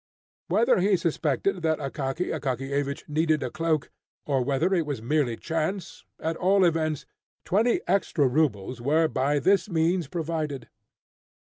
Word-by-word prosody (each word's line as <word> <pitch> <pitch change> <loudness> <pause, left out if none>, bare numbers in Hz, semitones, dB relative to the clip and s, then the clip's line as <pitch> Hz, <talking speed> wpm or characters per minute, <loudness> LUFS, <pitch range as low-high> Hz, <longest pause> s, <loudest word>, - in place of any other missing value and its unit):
Whether - - +3
he 200 -1 +3
suspected 165 +3 0
that 160 -1 +1
Akaky 140 +3 -3
Akakiyevich 140 0 -2
needed 155 -1 +1
a 125 - -3
cloak, 160 -3 -1 0.3
or 135 -3 +1
whether 145 +8 +1
it 175 -3 +2
was 145 -5 -3
merely 120 -1 0
chance, 165 +3 -3
at 160 +1 -2
all 190 +1 +4
events, 155 -3 0 0.4
twenty 230 - +2
extra 165 -7 +2
rubles 125 -5 0
were 155 +5 +3
by 145 0 0
this 195 +7 +2
means 170 -1 +1
provided. 155 -5 -3
155 Hz, 135 wpm, -26 LUFS, 140-170 Hz, 0.4 s, all